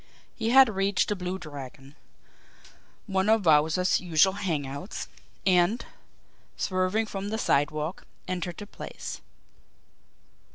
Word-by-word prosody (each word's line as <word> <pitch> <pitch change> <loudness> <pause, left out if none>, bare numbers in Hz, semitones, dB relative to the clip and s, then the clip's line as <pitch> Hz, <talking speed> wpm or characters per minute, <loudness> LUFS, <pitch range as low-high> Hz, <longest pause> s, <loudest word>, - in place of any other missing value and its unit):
He 225 -1 -1
had 265 +2 +8
reached 195 -2 +1
the 205 - 0
Blue 180 0 -4
Dragon, 140 -4 -10 1.1
one 195 0 0
of 220 -3 +3
Wowzer's 160 +4 +4
usual 180 +1 +3
hang 170 -8 -2
outs, 140 - -6 0.4
and, 185 +4 +3 0.7
swerving 185 +3 0
from 200 -1 -5
the 220 - -2
sidewalk, 155 -2 0 0.2
entered 180 -2 -3
the 205 - -7
place. - - -8
185 Hz, 115 wpm, -27 LUFS, 155-200 Hz, 1.1 s, had